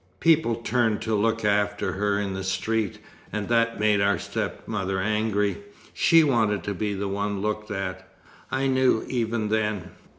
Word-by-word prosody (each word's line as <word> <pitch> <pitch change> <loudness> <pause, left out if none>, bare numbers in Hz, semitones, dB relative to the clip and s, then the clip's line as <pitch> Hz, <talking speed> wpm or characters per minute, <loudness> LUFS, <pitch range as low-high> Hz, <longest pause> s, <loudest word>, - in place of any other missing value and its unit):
People 160 -8 +3
turned 115 -2 0
to 110 - -1
look 115 +1 +1
after 105 0 +1
her 100 +1 0
in 100 -2 -2
the 95 0 -4
street, 100 +2 -1 0.3
and 105 -1 -3
that 115 -1 +2
made 105 -1 +3
our 100 0 +3
stepmother 95 -3 -3
angry. 105 0 0 0.4
She 165 -1 +5
wanted 110 - +1
to 105 - -2
be 100 +1 -2
the 100 +1 -3
one 100 +1 -2
looked 105 0 -2
at. 95 -2 -5 0.4
I 130 +1 0
knew, 130 -3 +2
even 115 -3 -1
then! 105 -3 -1
105 Hz, 160 wpm, -25 LUFS, 100-115 Hz, 0.4 s, She